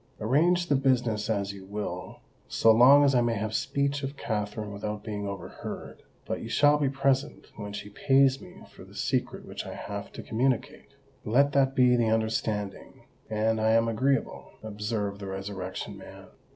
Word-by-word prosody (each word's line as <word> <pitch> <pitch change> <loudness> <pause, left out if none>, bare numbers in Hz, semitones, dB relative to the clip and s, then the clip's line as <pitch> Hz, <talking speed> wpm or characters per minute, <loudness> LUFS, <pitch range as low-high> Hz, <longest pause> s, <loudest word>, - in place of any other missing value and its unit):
"Arrange 170 +10 +2
the 150 - +2
business 125 -6 +1
as 100 -2 -1
you 100 -1 -10
will, 105 +2 -6 0.3
so 115 - +4
long 130 +6 +7
as 140 -1 +4
I 125 - +4
may 120 -1 +1
have 110 +1 -3
speech 140 +4 0
of 135 0 -5
Katherine 105 -2 -3
without 105 +1 -5
being 105 -2 -4
overheard; 100 -3 -7 0.2
but - - -3
you - - -6
shall 145 0 +4
be 140 -2 +2
present 135 +1 0
when 105 -1 -6
she 100 0 -7
pays 135 +3 +3
me - - -13
for - - -13
the - - -16
secret - - -2
which - - -6
I - - -7
have - - -6
to - - -8
communicate." 130 +3 -2 0.3
"Let 140 +6 +3
that 135 -1 +2
be 125 -1 +5
the 115 -2 +2
understanding, 110 -2 -2 0.3
and 110 +1 0
I 110 0 +3
am 115 0 +3
agreeable," 130 +3 -1
observed 105 -1 -3
the 100 - -7
Resurrection 95 -1 -5
Man. - - -12
110 Hz, 175 wpm, -28 LUFS, 105-135 Hz, 0.3 s, long